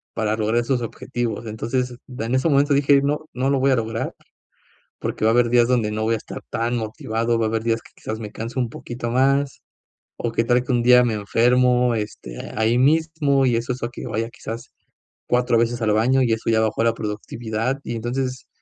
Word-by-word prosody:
para 110 -1 0
lograr 110 +2 +1
esos 125 0 0
objetivos”. 115 0 -4
Entonces, 125 +3 -2 0.2
en 115 +3 -1
ese 130 +5 +2
momento 145 +1 +3
dije: 140 0 +4
“No 150 +2 -1
no 130 +2 0
lo 140 - +2
voy 135 +1 +3
a - - +4
lograr, 115 0 -2 0.9
porque - - -3
va 110 - +5
a - - +1
haber 120 -1 +3
días 120 0 +4
donde 115 -4 +2
no 110 +1 -2
voy 115 +1 +2
a - - -1
estar - - -8
tan 115 +1 -1
motivado, 115 +1 -1
va 115 - +1
a - - 0
haber 110 0 -1
días 115 0 +1
que, - - -18
quizás, 110 0 -5
me 105 -2 -6
canso 115 +3 -5
un 120 -2 -1
poquito 120 0 -6
más, 135 +2 +1 0.6
o 120 - -2
que 115 - +2
tal 120 +1 +3
que 130 - -3
un 120 -1 +2
día 125 0 +7
me 120 - 0
enfermo, 125 +3 +3
este, 105 - -5 0.2
ahí 110 +2 +2
mismo, 150 -1 +3
y 120 -2 +2
eso 120 +2 -2
hace 125 -1 -4
a 120 - -3
que 120 - -8
vaya 115 0 -2
quizás 120 -1 -8 0.6
4 125 -1 +2
veces 115 +1 0
al 105 -1 +2
baño 130 +5 +3
y 115 -3 +2
eso 110 +1 -2
ya 110 -1 +3
bajó 110 +1 0
la 115 0 +3
productividad”. 110 +3 -3
Y 120 - -4
entonces, 125 +2 -3
120 Hz, 220 wpm, -22 LUFS, 115-125 Hz, 0.9 s, día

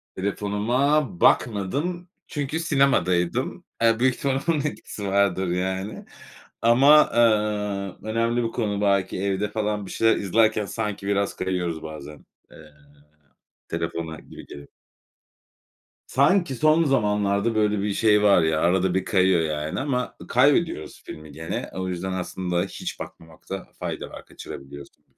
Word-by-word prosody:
Telefonuma 110 +9 +1 0.2
bakmadım 145 - +1 0.2
çünkü 145 +2 -3
sinemadaydım. 135 - +1 0.2
Eee, 115 0 +3
büyük 130 0 +3
ihtimal 135 -1 -1
onun 165 - +3
etkisi 125 -8 -5
vardır, 95 -1 +1
yani. 95 +3 -3 0.6
Ama, 135 +6 +6
eee, 105 -3 0
önemli 115 +2 0
bir 115 - -2
konu. 105 -3 -2
Belki 100 -2 +1
evde 100 +1 -1
falan 105 -1 -2
bir - - -9
şeyler 115 0 +3
izlerken 110 +1 +2
sanki 105 -2 -4
biraz 100 0 0
kayıyoruz 90 -3 -2
bazen. 75 -1 -9 0.3
Eee, - - -14 1.1
telefona 85 -1 -4
gibi - - -13
geliyor. 70 0 -11 1.4
Sanki 155 +1 +2
son 155 +5 +4
zamanlarda 105 -4 +1
böyle 105 -1 +2
bir 100 -1 -1
şey 105 -1 +3
var 100 -4 +5
ya, 80 -1 +1
arada 90 +1 +2
bir 95 - 0
kayıyor 95 -3 +3
yani 75 +2 -2
ama 130 -3 -2
ı - - -11
kaybediyoruz 140 - +1
filmi 75 -1 -10
gene. 80 +2 -5
O 95 0 -4
yüzden 90 +1 -3
aslında 90 -1 -2
hiç 95 - -6
bakmamakta 85 +4 -9
fayda - - -5
var. - - -11
Kaçırabiliyorsun. 70 +1 -11
105 Hz, 130 wpm, -24 LUFS, 95-120 Hz, 1.4 s, Ama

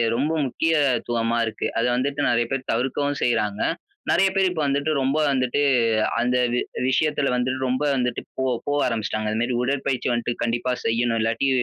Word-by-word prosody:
ரொம்ப 140 +6 0
முக்கியத்துவமா 125 -6 +1
இருக்கு. 110 - -3
அத - - +2
வந்துட்டு, 140 +3 -1
நெறைய 120 0 +2
பேர் 135 -1 -3
தவிர்க்கவும் 135 +4 -1
செய்றாங்க. 105 -4 0 0.5
நெறைய 195 +2 +4
பேர் 195 -1 +3
இப்போ 160 -4 -2
வந்துட்டு, 140 +2 0
ரொம்ப 135 +3 +1
வந்துட்டு 130 +1 0 0.6
அந்த 125 +1 +1 0.2
வி 125 - +1 0.3
விஷயத்துல 145 0 +1
வந்துட்டு, 130 +1 -1
ரொம்ப 130 +3 0
வந்துட்டு 125 -2 -1 0.2
போ - - +1 0.2
போவ 145 0 +1
ஆரம்பிச்சுட்டாங்க. 110 -2 -2
இது 110 - -1
மேரி 120 +1 0
உடற்பயிற்சி 135 -1 -1
வந்துட்டு, 120 0 -1
கண்டிப்பா 120 +2 0
செய்யணும். 115 0 +1
இல்லாட்டி 115 +5 +1
125 Hz, 160 wpm, -23 LUFS, 120-140 Hz, 0.6 s, நெறைய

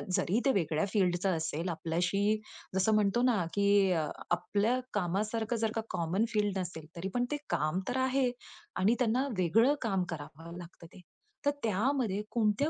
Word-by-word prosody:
जरी 205 +7 +1
ते 270 - +5
वेगळ्या 160 -2 +1
फील्डचं 185 -2 +1
असेल 160 +2 -2
आपल्याशी 180 +6 0 0.4
जसं 190 +3 +3
म्हणतो 210 +3 +2
ना, 225 -9 +2
की 200 -1 +4 0.4
आपल्या 210 +7 +1
कामासारखं 210 +5 -1
जर 220 - +2
का 225 - 0
कॉमन 175 +7 0
फील्ड 205 -3 0
नसेल, 170 -3 -5
तरी 175 +3 -4
पण 245 0 +1
ते 295 - 0
काम 155 +5 0
तर 250 - -1
आहे 260 0 +2 0.5
आणि 215 +6 +4
त्यांना 250 +3 +2
वेगळं 225 - +4
काम 195 -6 +1
करावं 165 +2 -8
लागतं 175 -1 -11
ते. 185 - -13 0.4
तर 285 - +4
त्यामध्ये 220 -1 +1
कोणत्या 225 +5 +2
200 Hz, 155 wpm, -31 LUFS, 175-230 Hz, 0.5 s, ते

